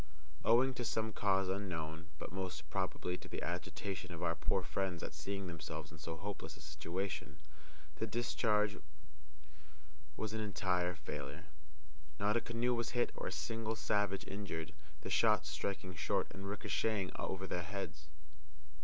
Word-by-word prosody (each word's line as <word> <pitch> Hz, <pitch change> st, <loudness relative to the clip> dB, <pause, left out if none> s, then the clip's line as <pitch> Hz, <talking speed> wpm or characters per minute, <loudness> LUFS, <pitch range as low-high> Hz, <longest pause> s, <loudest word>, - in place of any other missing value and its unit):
Owing 125 Hz, +4 st, +6 dB
to 125 Hz, -, -2 dB
some 110 Hz, -1 st, +1 dB
cause 95 Hz, -2 st, +4 dB
unknown, 85 Hz, -4 st, -2 dB
but -, -, -5 dB
most 95 Hz, -5 st, -3 dB
probably 95 Hz, -1 st, 0 dB
to -, -, -9 dB
the -, -, -3 dB
agitation 95 Hz, -2 st, -2 dB
of 85 Hz, -, -4 dB
our -, -, +4 dB
poor -, -, +2 dB
friends 95 Hz, -3 st, 0 dB
at -, -, -3 dB
seeing 95 Hz, +6 st, -2 dB
themselves 85 Hz, -3 st, -4 dB
in 80 Hz, -, -11 dB
so 80 Hz, +1 st, -3 dB
hopeless 100 Hz, +3 st, -4 dB
a -, -, -13 dB
situation, 85 Hz, +6 st, -3 dB, 0.6 s
the 110 Hz, -, 0 dB
discharge 105 Hz, -2 st, +3 dB, 1.4 s
was 110 Hz, -1 st, -1 dB
an 110 Hz, -, 0 dB
entire 90 Hz, -4 st, +2 dB
failure. 75 Hz, -3 st, -5 dB, 0.7 s
Not 105 Hz, +2 st, +4 dB
a 120 Hz, -, +4 dB
canoe 120 Hz, +1 st, +2 dB
was 120 Hz, +1 st, 0 dB
hit 120 Hz, -, +4 dB
or -, -, -3 dB
a -, -, -1 dB
single 115 Hz, -1 st, -1 dB
savage 100 Hz, -3 st, +2 dB
injured, 95 Hz, -5 st, -3 dB, 0.3 s
the -, -, -4 dB
shots 75 Hz, -, +5 dB
striking 95 Hz, +4 st, -2 dB
short 80 Hz, -, +2 dB
and 95 Hz, 0 st, -5 dB
ricocheting 105 Hz, -1 st, +1 dB
over 95 Hz, 0 st, -1 dB
their 90 Hz, -2 st, 0 dB
heads. 85 Hz, -4 st, -4 dB
95 Hz, 155 wpm, -38 LUFS, 90-105 Hz, 1.4 s, Owing